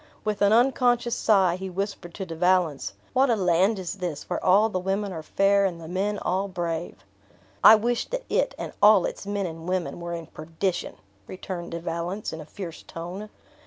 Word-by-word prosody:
With 210 -1 -1
an 205 0 +5
unconscious 245 0 +3
sigh, 190 -5 +3
he 190 0 -5
whispered 190 -2 -5
to 195 - -4
De 165 - -7
Valence, 175 -4 +1 0.2
"What 265 +1 +3
a 235 - +4
land 190 +2 +2
is 190 +1 -5
this, 170 -5 -4
where - - -3
all 200 +4 +5
the 185 -4 -2
women 195 +1 -2
are 160 - -5
fair, 200 +5 +2
and 180 -4 -1
the 165 - -9
men 195 +4 -1
all 190 +1 -1
brave!" 170 -3 -4 0.6
"I 220 - +11
wish 235 +2 0
that - - -3
it, - - 0
and - - -6
all 205 -3 +7
its - - -5
men 205 -1 -1
and 165 0 -6
women, 185 -2 -2
were 170 0 -4
in 165 -1 -6
perdition!" 165 +4 -3 0.3
returned 180 -2 -6
De 170 - -3
valence, 170 +4 -4
in 160 - -6
a - - -10
fierce 170 0 -8
tone. 180 +6 -7
185 Hz, 200 wpm, -25 LUFS, 170-205 Hz, 0.6 s, I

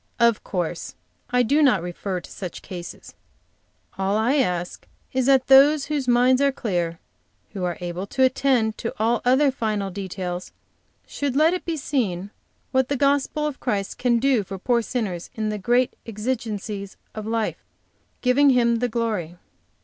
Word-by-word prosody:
"Of 235 -2 +3
course, 175 -4 -3 0.3
I 250 0 +3
do 285 +6 +3
not, 245 - +4
refer 180 +1 -4
to - - -13
such 185 -4 -7
cases. 175 -2 -9 0.9
All 195 +2 +1
I 240 +7 +2
ask 180 -9 -1 0.3
is 260 -1 +1
that 265 -2 +5
those 275 +2 +6
whose 290 -3 -2
minds 250 +2 +4
are 280 0 +4
clear, 175 -9 -2 0.6
who 195 -3 -4
are 175 -2 -2
able 175 +2 -4
to 260 - +1
attend 255 -4 +2
to - - -4
all 230 +2 +1
other 265 +3 +4
final 215 -6 -2
details, 185 -2 -5 0.5
should 280 -3 -3
let 315 +4 +4
it 365 - -4
be 330 -2 -2
seen 205 - -2 0.4
what 260 0 +2
the 280 - 0
gospel 285 +2 +1
of 295 -3 -3
Christ 200 -2 -2
can 245 -1 +3
do 250 -3 +2
for 195 +1 -7
poor 235 +5 +1
sinners 210 -8 -3
in 215 -1 -1
the 210 0 -3
great 240 +5 +2
exigency 215 -3 -3 0.2
of 215 0 -6
life, 225 -1 -2 0.6
giving 270 +3 +4
Him 235 -2 +3
the 245 +1 0
glory. 215 -8 -2
230 Hz, 165 wpm, -23 LUFS, 195-260 Hz, 0.9 s, those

